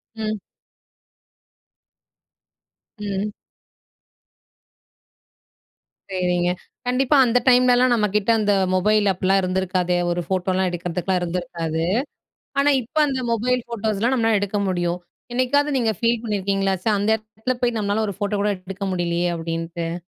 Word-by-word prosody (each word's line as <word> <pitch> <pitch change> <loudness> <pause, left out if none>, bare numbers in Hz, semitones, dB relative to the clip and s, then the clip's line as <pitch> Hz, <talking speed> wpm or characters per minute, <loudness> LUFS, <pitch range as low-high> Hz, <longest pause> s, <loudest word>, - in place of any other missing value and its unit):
ம். 215 -1 -2 2.6
ம். 205 0 -3 2.8
சேரிங்க. 180 -1 +1 0.4
கண்டிப்பா 265 +3 +3
அந்த 245 +1 +3
டைம்லலாம் 250 0 +5
நம்மகிட்ட 210 0 +1
அந்த 205 -1 +2 0.2
மொபைல் 210 +2 +3
அப்லாம் 190 +2 +2
இருந்திருக்காதே, 185 -1 0
ஒரு 175 0 -1
ஃபோட்டோலாம் 185 0 0
எடுக்கிறதுக்குலாம் 180 +1 -2
இருந்திருக்காது. 170 -2 -3 0.8
ஆனா 290 +1 +4
இப்போ 260 +7 -3
அந்த 265 -2 -1
மொபைல் 250 +2 +1
ஃபோட்டோஸ்லாம் 225 +1 0
நம்மனால 225 -3 +2
எடுக்க 205 +1 -1
முடியும். 175 -1 -1 0.3
என்னைக்காவது 285 +4 +2
நீங்க 225 -3 +2
ஃபீல் 230 -1 +1
பண்ணியிருக்கீங்களா? 195 -2 0
ச்ச! - - -4
அந்த 205 +2 0
இடத்துல 220 +3 -4
போய் 240 -2 +1
நம்மளால 210 +1 0
ஒரு 200 - -4
ஃபோட்டோ 205 0 -1
கூட 210 0 +2
எடுக்க 195 +2 -6
முடியலையே. 175 0 0
அப்டின்ட்டு. 165 0 -4
200 Hz, 115 wpm, -22 LUFS, 180-230 Hz, 2.8 s, டைம்லலாம்